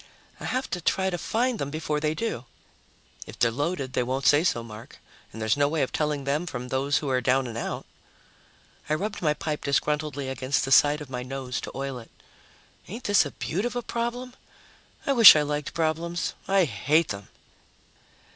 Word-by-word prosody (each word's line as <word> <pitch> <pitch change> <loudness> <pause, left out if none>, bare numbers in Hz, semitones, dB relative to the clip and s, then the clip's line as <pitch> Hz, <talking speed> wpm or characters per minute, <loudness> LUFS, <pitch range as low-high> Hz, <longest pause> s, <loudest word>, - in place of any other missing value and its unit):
I - - -7
have 255 +1 -1
to 180 - -2
try 190 +3 +1
to 175 - -2
find 240 0 0
them 140 - -2
before 155 0 -2
they 155 +1 -1
do." 160 - -3 0.8
"If - - -10
they're 115 - +3
loaded, 145 +1 -2
they - - +1
won't 130 +2 -2
say 145 +4 +5
so, 120 -10 +1
Mark, 110 0 -11 0.3
and 110 - -9
there's 110 -1 +1
no 145 0 +3
way 155 0 0
of 130 - -2
telling 150 -2 -1
them 145 +5 -1
from 125 -4 -5
those 135 +2 +1
who 145 - -2
are 125 -1 +2
down 130 +2 +2
and 120 -2 -6
out." 115 - -4 1.0
I 155 - +2
rubbed 205 +5 -4
my 150 -3 +2
pipe 150 -1 -4
disgruntledly 145 0 -1
against 130 +1 -1
the 135 - -5
side 145 +2 +5
of 140 -3 -9
my 125 -1 -3
nose 130 0 -4
to - - -6
oil 135 -2 -4
it. 115 - -14 0.8
"Ain't 230 +6 -7
this 205 - +4
a - - -7
beaut 185 +6 -3
of 245 +1 -2
a 245 - -2
problem? 240 +2 -3 0.7
I 280 - +2
wish 230 -9 +11
I 150 - +3
liked 150 0 -3
problems. 170 +1 -1
I 195 -1 +4
hate 145 - +1
them." 100 0 -6
150 Hz, 200 wpm, -26 LUFS, 130-175 Hz, 1.0 s, wish